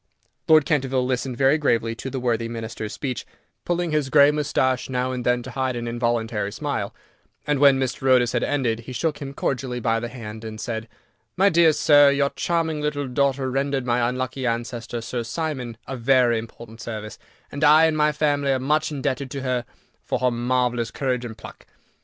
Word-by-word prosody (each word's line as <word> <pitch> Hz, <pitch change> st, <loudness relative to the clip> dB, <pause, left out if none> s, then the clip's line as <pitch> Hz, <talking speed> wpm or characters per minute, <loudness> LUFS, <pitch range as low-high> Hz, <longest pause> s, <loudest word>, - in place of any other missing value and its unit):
Lord 155 Hz, -2 st, +6 dB
Canterville 135 Hz, -5 st, +1 dB
listened 125 Hz, -1 st, -2 dB
very 135 Hz, +4 st, +4 dB
gravely 115 Hz, -5 st, +1 dB
to 125 Hz, +3 st, -6 dB
the 135 Hz, -, -4 dB
worthy 115 Hz, -2 st, -1 dB
Minister's 110 Hz, -2 st, -5 dB
speech, 130 Hz, -4 st, -4 dB, 0.4 s
pulling 175 Hz, -1 st, -1 dB
his 150 Hz, -3 st, 0 dB
grey 145 Hz, +1 st, +6 dB
moustache 135 Hz, -4 st, 0 dB
now 125 Hz, 0 st, -1 dB
and 125 Hz, -1 st, -4 dB
then 125 Hz, 0 st, +1 dB
to 130 Hz, -, -8 dB
hide 130 Hz, 0 st, -1 dB
an 120 Hz, 0 st, -4 dB
involuntary 115 Hz, -3 st, -1 dB
smile, -, -, -3 dB, 0.5 s
and 145 Hz, -2 st, 0 dB
when 140 Hz, -2 st, +6 dB
Mr. 130 Hz, 0 st, -1 dB
Otis 125 Hz, -2 st, +4 dB
had 120 Hz, -, 0 dB
ended, 125 Hz, -6 st, 0 dB
he 120 Hz, +2 st, -9 dB
shook 155 Hz, +3 st, -1 dB
him 140 Hz, -2 st, -7 dB
cordially 125 Hz, -3 st, -2 dB
by 115 Hz, -1 st, +1 dB
the 120 Hz, -, -4 dB
hand, 110 Hz, -3 st, -8 dB
and 110 Hz, -1 st, -7 dB
said: 115 Hz, -1 st, -4 dB, 0.5 s
"My 195 Hz, +2 st, +5 dB
dear 170 Hz, -2 st, +5 dB
sir, 145 Hz, -1 st, +6 dB
your 140 Hz, 0 st, +1 dB
charming 160 Hz, -3 st, -1 dB
little 145 Hz, -2 st, -2 dB
daughter 135 Hz, 0 st, 0 dB
rendered 135 Hz, 0 st, -1 dB
my 120 Hz, -1 st, +1 dB
unlucky 130 Hz, +1 st, -3 dB
ancestor, 120 Hz, 0 st, -3 dB
Sir 120 Hz, +2 st, -3 dB
Simon, 125 Hz, -2 st, -4 dB
a 135 Hz, -, -5 dB
very 120 Hz, -1 st, +3 dB
important 115 Hz, 0 st, -11 dB
service, 110 Hz, -2 st, -6 dB, 0.3 s
and 140 Hz, +2 st, -4 dB
I 155 Hz, +2 st, +7 dB
and 160 Hz, -1 st, +1 dB
my 150 Hz, 0 st, +3 dB
family 145 Hz, -2 st, +1 dB
are -, -, +1 dB
much 150 Hz, +4 st, 0 dB
indebted 140 Hz, -2 st, -2 dB
to 135 Hz, 0 st, -5 dB
her 125 Hz, -2 st, -1 dB, 0.4 s
for -, -, -1 dB
her 125 Hz, -1 st, +1 dB
marvellous 120 Hz, -1 st, 0 dB
courage 125 Hz, -2 st, -2 dB
and 110 Hz, -2 st, -8 dB
pluck. -, -, -12 dB
130 Hz, 190 wpm, -23 LUFS, 120-145 Hz, 0.5 s, I